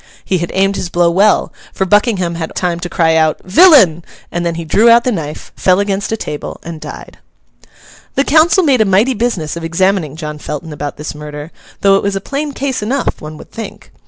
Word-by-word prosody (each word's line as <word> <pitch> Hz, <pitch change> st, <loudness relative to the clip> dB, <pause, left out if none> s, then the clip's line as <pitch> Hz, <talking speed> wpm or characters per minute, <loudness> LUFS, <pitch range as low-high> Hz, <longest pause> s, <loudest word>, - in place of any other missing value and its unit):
He 185 Hz, -, 0 dB
had 170 Hz, -, -3 dB
aimed 195 Hz, +1 st, +1 dB
his 175 Hz, -, -4 dB
blow 175 Hz, -1 st, +2 dB
well, 200 Hz, +4 st, +2 dB, 0.2 s
for 190 Hz, -, -1 dB
Buckingham 205 Hz, -3 st, +2 dB
had -, -, -6 dB
only -, -, -7 dB
had 160 Hz, -, -5 dB
time 175 Hz, -2 st, -1 dB
to 175 Hz, 0 st, -5 dB
cry 160 Hz, -1 st, +2 dB
out, 160 Hz, -1 st, +2 dB
'Villain!' 190 Hz, -, +5 dB, 0.3 s
and 175 Hz, 0 st, -2 dB
then 170 Hz, -1 st, -1 dB
he 165 Hz, 0 st, -5 dB
drew 215 Hz, +9 st, +4 dB
out 235 Hz, +1 st, +6 dB
the 250 Hz, -, 0 dB
knife, 155 Hz, -7 st, -5 dB
fell 185 Hz, 0 st, +2 dB
against 200 Hz, 0 st, -1 dB
a 225 Hz, -, -1 dB
table, 150 Hz, -7 st, -6 dB
and 165 Hz, -2 st, -8 dB
died. -, -, -10 dB, 1.0 s
The 275 Hz, -, +2 dB
council 320 Hz, +5 st, +4 dB
made 270 Hz, -7 st, +3 dB
a -, -, +4 dB
mighty 205 Hz, +7 st, +3 dB
business 215 Hz, -10 st, -2 dB
of 170 Hz, -, -6 dB
examining 170 Hz, -2 st, 0 dB
John 150 Hz, -2 st, -6 dB
Felton 150 Hz, +2 st, -6 dB
about 145 Hz, -1 st, -5 dB
this 150 Hz, +1 st, -6 dB
murder, 150 Hz, +1 st, -8 dB, 0.3 s
though 195 Hz, -1 st, +5 dB
it -, -, -1 dB
was 200 Hz, 0 st, -1 dB
a -, -, -1 dB
plain 285 Hz, +8 st, -4 dB
case 265 Hz, -3 st, -3 dB
enough, 250 Hz, +6 st, -2 dB
one 155 Hz, 0 st, -8 dB
would -, -, -14 dB
think. 225 Hz, -, -9 dB
185 Hz, 220 wpm, -15 LUFS, 160-220 Hz, 1.0 s, out